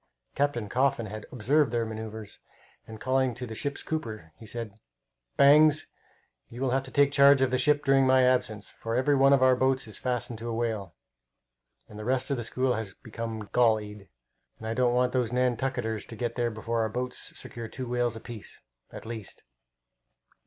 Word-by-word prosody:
Captain 140 Hz, -6 st, 0 dB
Coffin 125 Hz, +1 st, +1 dB
had 110 Hz, +1 st, -8 dB
observed 135 Hz, +4 st, +2 dB
their 115 Hz, -1 st, 0 dB
manoeuvres, 110 Hz, -1 st, -7 dB, 0.5 s
and 110 Hz, -1 st, -9 dB
calling 130 Hz, 0 st, +1 dB
to 125 Hz, -, -5 dB
the 115 Hz, -, -7 dB
ship's 140 Hz, +5 st, -2 dB
cooper, 110 Hz, -, -5 dB
he 110 Hz, -, -13 dB
said, 115 Hz, -2 st, -6 dB, 0.6 s
"Bangs, 150 Hz, +2 st, +6 dB, 0.6 s
you 120 Hz, -, -10 dB
will 130 Hz, -1 st, 0 dB
have 135 Hz, +1 st, +2 dB
to 135 Hz, -, -10 dB
take 140 Hz, +1 st, +3 dB
charge 140 Hz, -1 st, +6 dB
of 130 Hz, -, +1 dB
the 130 Hz, -, +1 dB
ship 145 Hz, +2 st, +2 dB
during 135 Hz, -1 st, +4 dB
my 130 Hz, 0 st, +5 dB
absence, 115 Hz, -5 st, 0 dB
for 115 Hz, 0 st, -4 dB
every 130 Hz, +4 st, +2 dB
one 135 Hz, 0 st, +5 dB
of 135 Hz, -2 st, +5 dB
our 130 Hz, 0 st, +6 dB
boats 130 Hz, 0 st, +1 dB
is 110 Hz, -, -9 dB
fastened 125 Hz, -2 st, -3 dB
to 120 Hz, +1 st, -5 dB
a 115 Hz, -, -2 dB
whale, 110 Hz, -6 st, -3 dB, 0.9 s
and 105 Hz, -, -11 dB
the -, -, -6 dB
rest 130 Hz, +3 st, 0 dB
of 140 Hz, -, 0 dB
the 120 Hz, -, -3 dB
school 130 Hz, +3 st, 0 dB
has 110 Hz, -4 st, -5 dB
become 115 Hz, -2 st, -6 dB
gallied, 105 Hz, -4 st, +1 dB, 0.5 s
and 110 Hz, -, -10 dB
I 110 Hz, -, -1 dB
don't 125 Hz, 0 st, +2 dB
want 125 Hz, 0 st, +2 dB
those 125 Hz, -3 st, 0 dB
Nantucketers 125 Hz, -3 st, -1 dB
to 115 Hz, -, -9 dB
get 115 Hz, +1 st, -3 dB
there 120 Hz, -1 st, 0 dB
before 115 Hz, +1 st, -2 dB
our 110 Hz, -, 0 dB
boats 125 Hz, +3 st, -5 dB
secure 115 Hz, -1 st, -6 dB
two 130 Hz, +2 st, -6 dB
whales 120 Hz, -1 st, 0 dB
apiece, 115 Hz, -1 st, -9 dB, 0.3 s
at -, -, -9 dB
least." 110 Hz, -3 st, -8 dB
120 Hz, 190 wpm, -28 LUFS, 110-130 Hz, 0.9 s, Bangs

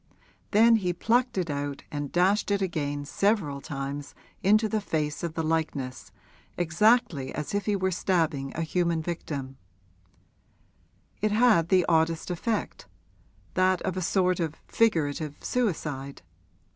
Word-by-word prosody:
Then 225 Hz, +2 st, +6 dB
he 180 Hz, -4 st, -1 dB
plucked 240 Hz, +6 st, +1 dB
it 175 Hz, -4 st, -1 dB
out 145 Hz, 0 st, -4 dB
and 145 Hz, -1 st, -4 dB
dashed 190 Hz, +5 st, +2 dB
it 200 Hz, 0 st, +2 dB
again 145 Hz, -6 st, -2 dB
several 170 Hz, -5 st, 0 dB
times 140 Hz, +1 st, -5 dB, 0.3 s
into 215 Hz, +3 st, +4 dB
the 215 Hz, 0 st, -1 dB
face 150 Hz, -5 st, -2 dB
of 170 Hz, -2 st, -4 dB
the 160 Hz, -, -1 dB
likeness, 155 Hz, -5 st, -2 dB, 0.5 s
exactly 175 Hz, -, +2 dB
as 150 Hz, +4 st, -4 dB
if 205 Hz, +1 st, -1 dB
he 210 Hz, -, +2 dB
were 190 Hz, -1 st, 0 dB
stabbing 160 Hz, -7 st, 0 dB
a 165 Hz, -, -1 dB
human 170 Hz, -1 st, 0 dB
victim: 145 Hz, -6 st, -5 dB, 1.6 s
it 215 Hz, 0 st, +1 dB
had 215 Hz, -7 st, +4 dB
the 185 Hz, -2 st, +4 dB
oddest 165 Hz, +1 st, +1 dB
effect 210 Hz, +5 st, -3 dB, 0.7 s
that 185 Hz, 0 st, +3 dB
of 185 Hz, -2 st, -2 dB
a 185 Hz, -, -2 dB
sort 185 Hz, 0 st, +1 dB
of 160 Hz, -2 st, -2 dB
figurative 155 Hz, -8 st, +1 dB
suicide. 150 Hz, -, -2 dB
170 Hz, 135 wpm, -27 LUFS, 145-200 Hz, 1.6 s, Then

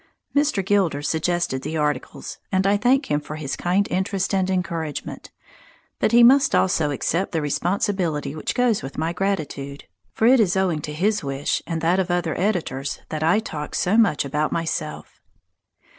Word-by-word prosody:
Mr. 285 Hz, -10 st, +2 dB
Gilder 190 Hz, -8 st, +1 dB
suggested 160 Hz, -3 st, 0 dB
the 160 Hz, -, -4 dB
articles, 150 Hz, -3 st, -3 dB
and 190 Hz, -1 st, +1 dB
I 200 Hz, +1 st, +4 dB
thank 245 Hz, -, +2 dB
him 145 Hz, -, +2 dB
for 150 Hz, -, -7 dB
his 145 Hz, -3 st, -4 dB
kind 185 Hz, +3 st, +1 dB
interest 190 Hz, +1 st, -1 dB
and 190 Hz, -1 st, +1 dB
encouragement. 170 Hz, -5 st, -3 dB, 0.7 s
But -, -, +2 dB
he 240 Hz, 0 st, +7 dB
must 270 Hz, +3 st, +6 dB
also 160 Hz, -5 st, +2 dB
accept 165 Hz, +7 st, -1 dB
the 165 Hz, -, +1 dB
responsibility 165 Hz, -2 st, -1 dB
which 155 Hz, -, -3 dB
goes 245 Hz, -4 st, +2 dB
with 135 Hz, -, -8 dB
my 160 Hz, +2 st, -1 dB
gratitude. 155 Hz, -7 st, -3 dB, 0.3 s
For 220 Hz, -, 0 dB
it 255 Hz, +2 st, +6 dB
is 190 Hz, -4 st, +2 dB
owing 180 Hz, -5 st, +1 dB
to 150 Hz, -, -5 dB
his 205 Hz, +4 st, 0 dB
wish 135 Hz, 0 st, -1 dB
and 165 Hz, -2 st, -2 dB
that 175 Hz, +3 st, +2 dB
of 190 Hz, -1 st, 0 dB
other 175 Hz, -2 st, 0 dB
editors 165 Hz, -8 st, -1 dB
that 155 Hz, -1 st, -4 dB
I 165 Hz, +6 st, +3 dB
talk 155 Hz, -9 st, -4 dB
so 185 Hz, +4 st, +1 dB
much 210 Hz, -11 st, +3 dB
about 150 Hz, +2 st, -1 dB
myself. 160 Hz, -2 st, -4 dB
175 Hz, 175 wpm, -23 LUFS, 150-200 Hz, 0.7 s, he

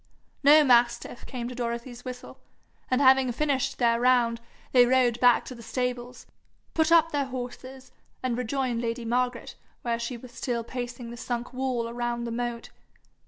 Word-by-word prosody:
No 300 Hz, +2 st, +7 dB
mastiff 240 Hz, -2 st, +2 dB
came 245 Hz, -3 st, -5 dB
to 250 Hz, -, -6 dB
Dorothy's 240 Hz, 0 st, -5 dB
whistle, 250 Hz, -1 st, -8 dB, 0.5 s
and 255 Hz, -, +2 dB
having 265 Hz, -1 st, +5 dB
finished 275 Hz, 0 st, -1 dB
their 235 Hz, -1 st, +2 dB
round, 240 Hz, -2 st, +3 dB, 0.3 s
they 245 Hz, -1 st, +6 dB
rode 245 Hz, -2 st, +3 dB
back 245 Hz, -1 st, +5 dB
to -, -, -7 dB
the 235 Hz, -, -11 dB
stables, 250 Hz, +1 st, -4 dB, 0.5 s
put 320 Hz, 0 st, +2 dB
up 330 Hz, -1 st, +5 dB
their 285 Hz, -1 st, 0 dB
horses, 255 Hz, 0 st, -8 dB, 0.3 s
and 255 Hz, -2 st, 0 dB
rejoined 250 Hz, -1 st, -1 dB
lady 230 Hz, 0 st, -3 dB
Margaret, 245 Hz, +1 st, -1 dB, 0.3 s
where 235 Hz, -1 st, -1 dB
she 235 Hz, +1 st, -4 dB
was 245 Hz, +1 st, -12 dB
still 240 Hz, -1 st, -3 dB
pacing 240 Hz, 0 st, -6 dB
the 240 Hz, -, -8 dB
sunk 240 Hz, +1 st, -4 dB
walk 255 Hz, -2 st, -1 dB
around 240 Hz, 0 st, -2 dB
the 235 Hz, -, -4 dB
moat. 235 Hz, 0 st, -4 dB
245 Hz, 165 wpm, -27 LUFS, 235-260 Hz, 0.5 s, No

